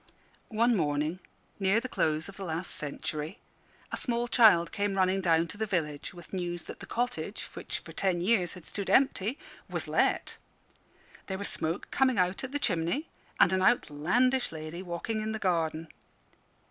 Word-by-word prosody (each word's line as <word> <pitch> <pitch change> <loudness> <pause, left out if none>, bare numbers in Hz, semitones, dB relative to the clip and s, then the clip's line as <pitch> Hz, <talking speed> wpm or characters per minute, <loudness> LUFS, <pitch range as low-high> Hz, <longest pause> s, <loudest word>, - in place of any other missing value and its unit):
One 235 +2 +3
morning, 150 0 0 0.4
near 195 +3 +3
the 255 - -5
close 155 -9 0
of 200 - -10
the 195 - -7
last 170 0 -3
century, 150 +1 -3 0.5
a - - -2
small 240 -1 0
child 210 -9 +6
came 200 -1 -1
running 190 +1 +3
down 165 -2 +3
to 205 - -7
the 220 - 0
village 150 -7 -2
with 175 +1 -13
news 175 -2 -3
that - - -9
the - - -9
cottage, 245 +1 -2
which - - -4
for - - -11
ten 185 -3 0
years 185 -1 +2
had 180 -4 -12
stood 200 -2 -5
empty, 260 -2 +3 0.3
was - - -3
let; - - +1 0.9
there 190 - -3
was 200 - 0
smoke 165 +4 -2
coming 260 -2 +3
out 180 +4 +1
at 260 - -4
the 290 - +1
chimney, 200 - 0 0.3
and 190 - +6
an 185 - +2
outlandish 240 - +2
lady 160 +2 -6
walking 190 +5 -3
in 220 +1 -2
the - - -1
garden. 165 -5 0
185 Hz, 170 wpm, -30 LUFS, 165-220 Hz, 0.9 s, child